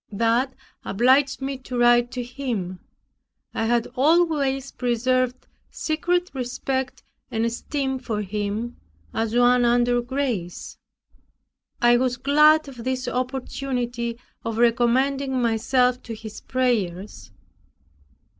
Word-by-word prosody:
That 230 +5 +1 0.3
obliged 265 +5 +2
me 270 -1 -3
to 255 -1 -6
write 240 0 +4
to 250 - -3
him. 235 -8 -4 0.7
I 225 - -1
had 235 0 +2
always 280 -2 +2
preserved 255 +1 0 0.2
secret 350 +3 -1
respect 260 0 -3 0.3
and 225 +1 0
esteem 265 +3 -2
for 220 -4 -3
him, 210 +4 -3 0.4
as 225 0 -1
one 245 0 +5
under 240 0 +3
grace. 240 -9 -3 1.0
I 240 0 +6
was 250 0 0
glad 300 +4 +5
of 250 -4 -9
this 255 0 -2
opportunity 250 -2 -3 0.3
of 225 -1 -3
recommending 255 +3 +2
myself 250 +2 +2
to 230 - -7
his 220 0 -9
prayers. 205 - -2
245 Hz, 110 wpm, -24 LUFS, 235-265 Hz, 1.0 s, I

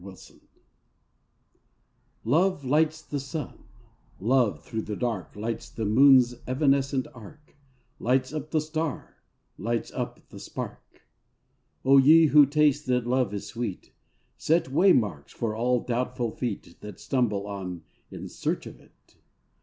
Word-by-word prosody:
T - - -16 1.9
OVE 160 +4 +2
lights 155 +3 +1
the 145 - -4
sun, 140 +3 -7 0.5
Love 120 +1 +1
through 110 - -4
the 105 - -5
dark 115 -6 -3
Lights 110 +2 -4
the 110 - -4
moon's 125 +2 +6
evanescent 135 0 +1
arc, 135 +6 -15 0.4
Lights 130 +3 0
up 155 -1 -5
the 155 -1 +1
star, 155 -2 -4 0.4
lights 115 +3 -2
up - - -6
the - - -11
spark. - - -8 0.8
O 135 +1 +7
ye 160 +4 +7
who 150 -1 +6
taste 150 0 +2
that 125 -2 +1
love 125 -3 +1
is 100 -1 -5
sweet, 115 -6 -6 0.4
Set 160 -4 +1
waymarks 125 - +2
for 110 -2 -3
all 125 +1 +1
doubtful 125 -1 -2
feet 105 -9 -5
That 105 -3 -9
stumble 110 -7 -1
on 95 -4 -6 0.3
in - - -8
search - - -3
of - - -11
it. - - -26
130 Hz, 130 wpm, -26 LUFS, 110-145 Hz, 1.9 s, O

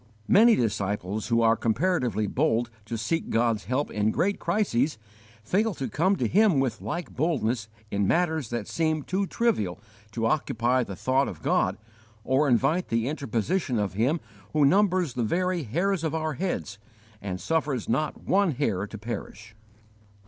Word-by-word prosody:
* - - -32
Many 225 +3 +6
disciples 105 -2 -2
who 115 -1 +2
are 115 0 +5
comparatively 120 - 0
bold 120 -1 0
to 115 +1 -4
seek 120 +10 -2
God's 115 -3 +1
help 130 +7 -1
in 105 0 +1
great 200 - 0
crises, 150 - 0 0.5
fail 200 - +1
to 135 - -3
come 185 - +2
to - - 0
Him 200 -8 +4
with 135 -3 -1
like 175 -1 -4
boldness 125 -7 -1 0.2
in 100 -1 +1
matters 160 - +1
that 120 -4 -3
seem 155 -2 0
too 190 +5 -1
trivial 145 - 0 0.3
to 115 0 -1
occupy 125 -1 +1
the 100 -4 -7
thought 130 +8 +1
of 80 -5 -8
God - - +1 0.5
or 135 +4 +2
invite 135 +9 +2
the 115 +1 0
interposition 140 - -1
of 100 -3 -1
Him 125 - +1 0.3
who 150 -2 +4
numbers 185 -2 +3
the 125 - -2
very 180 +8 0
hairs 170 - -1
of 160 -1 -1
our 155 -1 -1
heads 110 - -3 0.4
and 95 -2 -4
suffers 150 - -1
not 155 +6 -1
one 190 -3 +2
hair 105 -8 -1
to 110 - -8
perish. 110 0 -7
130 Hz, 165 wpm, -26 LUFS, 110-170 Hz, 0.5 s, Many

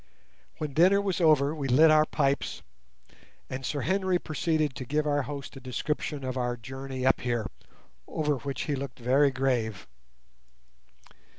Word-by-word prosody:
When 150 -3 -4
dinner 185 +7 +5
was 195 -2 -1
over 150 -3 +4
we 145 -4 -3
lit 155 +5 +6
our 155 0 +5
pipes, 140 -2 -1 0.9
and 130 +1 -4
Sir 145 +2 -2
Henry 190 +1 +1
proceeded 155 -3 -1
to 130 - -6
give 150 +4 -1
our 145 -1 +1
host 140 0 -7
a - - -7
description 140 +2 -3
of 130 0 -3
our 120 -1 -1
journey 130 +2 -6
up 130 - +3
here, 120 -3 -1 0.6
over 150 -2 -1
which 135 +3 -4
he 150 - -2
looked 135 -2 -5
very 130 +4 +3
grave. 125 -6 -1
140 Hz, 155 wpm, -28 LUFS, 130-155 Hz, 0.9 s, lit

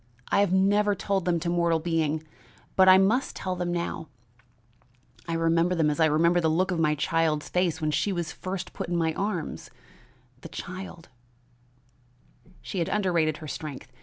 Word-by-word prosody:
I - - +3
have 200 -3 +3
never 205 +2 +3
told 195 -1 -1
them 175 -2 +1
to 175 - -2
mortal 170 -1 +2
being, 160 -2 -1 0.5
but 190 0 +6
I 185 - +9
must 215 +8 +2
tell 185 -1 -3
them 175 -1 -2
now; 170 -2 -3 1.2
I 165 - -2
remember 165 +2 +2
them 155 -3 +2
as 150 - -4
I 160 - +5
remember 170 +3 +3
the 160 - +2
look 185 +4 +1
of 175 - -1
my 150 -1 +2
child's 155 0 0
face 180 -3 0
when 155 -2 0
she 150 +7 0
was 170 -3 -3
first 185 0 -6
put - - -5
in 175 - 0
my 160 -1 +1
arms, 195 -3 -3 0.7
the - - -10
child 180 -2 -8 0.8
" 125 +8 -30
She 190 - -4
had 165 - -1
underrated 170 -7 +1
her - - -7
strength. 145 -2 -7
170 Hz, 180 wpm, -27 LUFS, 160-185 Hz, 1.2 s, I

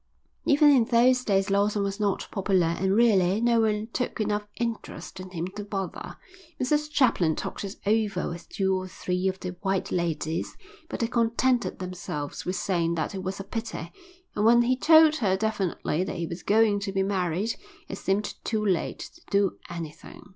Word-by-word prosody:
Even 290 0 +6
in 255 -5 +5
those 250 +2 +4
days 195 -2 +1
Lawson 205 +1 +2
was 200 +1 -3
not 205 -2 0
popular 190 -3 +2
and 190 +1 +2
really 205 -4 +4
no 235 0 +3
one 215 -1 +1
took 250 -1 -2
enough 210 -1 -1
interest 230 -4 -5
in 185 0 -8
him 170 -2 -4
to 205 - -5
bother. 195 -2 -5 0.4
Mrs 300 +4 +1
Chaplin 195 - +2
talked - - -5
it 200 0 -5
over 210 -3 +1
with 170 0 -7
two 190 -1 0
or 185 0 -3
three 180 0 -2
of 190 0 -2
the 180 -1 -5
white 195 -2 -1
ladies, 165 -2 -2 0.3
but - - -4
they 230 - +2
contented 235 +2 +1
themselves 180 -5 -5
with 180 - -2
saying 170 -2 0
that 160 +4 -2
it 190 - -4
was 190 +1 -4
a - - -4
pity; 210 -5 -5 0.4
and 210 - -1
when 235 +2 +6
he 255 +2 +2
told 315 +3 +6
her 190 -7 +1
definitely 190 -5 -1
that 190 - -4
he 170 - -2
was 170 +2 -6
going 210 -1 +3
to 200 -1 -3
be 195 0 +1
married 190 +2 -1 0.3
it 195 - -6
seemed 200 +2 -1
too 215 -2 -1
late 185 -4 0 0.2
to 340 - -19
do 200 -1 +1
anything. 170 +3 -9
200 Hz, 185 wpm, -26 LUFS, 185-225 Hz, 0.4 s, Even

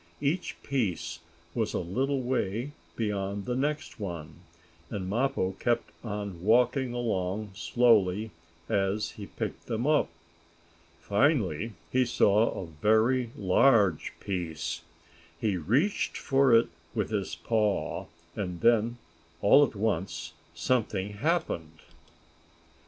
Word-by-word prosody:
Each 150 +6 -1
piece 90 - -1 0.3
was 110 -2 -1
a - - +1
little 130 +10 -1
way 125 +1 -1 0.2
beyond 100 -2 -2
the 125 - -1
next 145 0 -2
one, 85 -6 -6 0.5
and 95 -3 -4
Mappo 120 -2 0
kept 120 -1 0
on 100 -5 -5
walking 125 +4 +3
along 105 -4 -2
slowly 105 +2 +3 0.4
as 100 +2 0
he 100 -2 -9
picked - - -5
them 115 +1 -1
up. 150 0 +3 0.9
Finally 105 - +1 0.2
he 130 0 +4
saw 110 -2 +3
a 95 - -5
very 110 +10 +2
large 100 - +4
piece. 85 -5 -3 0.6
He 105 -1 +1
reached 125 - +1
for 135 -2 +3
it 115 0 +5 0.3
with 105 -2 -1
his 100 -3 -2
paw, 110 -3 0 0.3
and 90 -5 -4
then, 115 0 +3 0.4
all 105 +10 +7
at 130 - -1
once 90 -5 -2 0.2
something 105 +1 0
happened. 100 - -1
110 Hz, 115 wpm, -29 LUFS, 95-125 Hz, 0.9 s, all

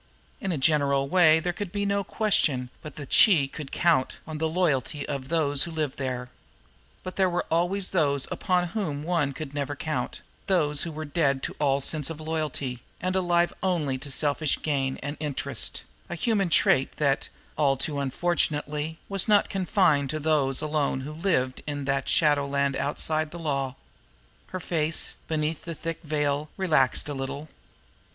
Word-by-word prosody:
In 195 - -2
a 165 - -1
general 140 -1 +2
way 160 -1 +5
there 175 +2 -2
could 200 0 -5
be 205 0 -1
no 200 0 +1
question 145 - +1
but 150 -3 -9
that 145 -3 -6
she 165 -10 +6
could 135 0 -8
count 165 -7 +2
on 155 -1 -6
the 160 0 0
loyalty 150 -5 0
of 135 -2 -4
those 145 -4 +2
who - - +2
lived 155 -4 -3
there; 125 -2 -3 0.7
but 185 - -7
there 190 -1 +3
were 175 0 -1
always 180 +4 +1
those 140 -6 +1
upon 180 -2 0
whom 165 -9 -3
one 165 -4 +1
could 145 0 -7
never 145 0 -2
count, 155 +1 -3 0.3
those 150 -6 +2
who 170 - -3
were 155 0 -5
dead 140 -3 +1
to - - -3
all 140 -1 +2
sense 150 +1 +1
of 160 -1 -6
loyalty, 155 -6 -3 0.2
and 185 0 -1
alive 175 -2 +2
only 155 -8 0
to 140 +1 -6
selfish 145 +1 +1
gain 135 -3 0
and 145 +2 -4
interest 150 -3 -1 0.3
a 175 - -3
human 200 0 +1
trait 135 -4 +3
that, 140 -2 +1 0.3
all 140 -2 +2
too 145 +2 -2
unfortunately, 150 +1 0
was 195 0 +2
not 210 -1 +4
confined 180 - +2
to 155 - -2
those 145 -3 +1
alone 150 -3 0
who 145 +3 -6
lived 155 -7 0
in 145 -1 -3
that 135 0 0
shadowland 140 -2 +2
outside 155 +2 0
the 175 - -9
law. 140 -5 -2 0.7
Her 185 - -5
face, 160 -2 -1
beneath 155 0 -1
the 165 -1 -5
thick 165 +1 -5
veil, 150 -1 -1
relaxed 160 -10 +2
a 145 - -3
little. 140 +3 -5
150 Hz, 170 wpm, -26 LUFS, 140-170 Hz, 0.7 s, she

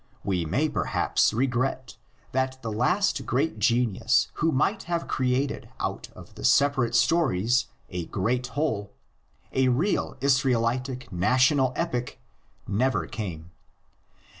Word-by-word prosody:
We 90 -4 -1
may 135 - +1
perhaps 150 - +1
regret 130 +1 -1 0.4
that 130 0 -1
the 115 - -3
last 155 - +1
great 135 -2 0
genius 115 0 +2
who 165 +1 +3
might 175 +10 +1
have 170 -1 -1
created 130 +1 -1
out - - -4
of - - -13
the - - -10
separate 135 -4 +3
stories 120 - +2 0.2
a 90 -2 -3
great 120 +6 -1
whole, 105 -10 -1 0.6
a 130 0 +3
real 140 +6 0
"Israelitic 130 -2 0
national 130 - +3
epic," 125 -8 -3 0.5
never 105 -3 +1
came. 85 -4 -6
125 Hz, 115 wpm, -26 LUFS, 110-135 Hz, 0.6 s, who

